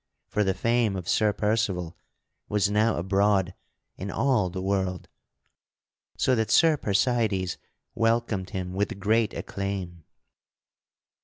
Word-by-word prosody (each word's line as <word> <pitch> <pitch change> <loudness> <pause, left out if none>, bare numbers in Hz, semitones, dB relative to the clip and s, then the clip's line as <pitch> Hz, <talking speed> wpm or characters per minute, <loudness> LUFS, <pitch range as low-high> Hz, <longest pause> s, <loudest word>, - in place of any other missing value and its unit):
For 105 - +1
the 95 -2 0
fame 115 -3 +1
of 90 -3 -5
Sir 105 -1 +3
Percival 100 -6 -1 0.5
was 105 -1 +1
now 110 +2 +2
abroad 95 +1 +1 0.4
in 95 - -5
all 120 -6 +1
the 95 +2 -5
world, 95 -1 -1 1.1
so 130 - +2
that 110 -3 0
Sir 165 -1 +5
Percydes 105 -5 0 0.4
welcomed 115 -4 0
him 90 -1 -4
with 100 0 -2
great 110 +2 +1
acclaim. 95 -4 -5
100 Hz, 120 wpm, -26 LUFS, 95-110 Hz, 1.1 s, Sir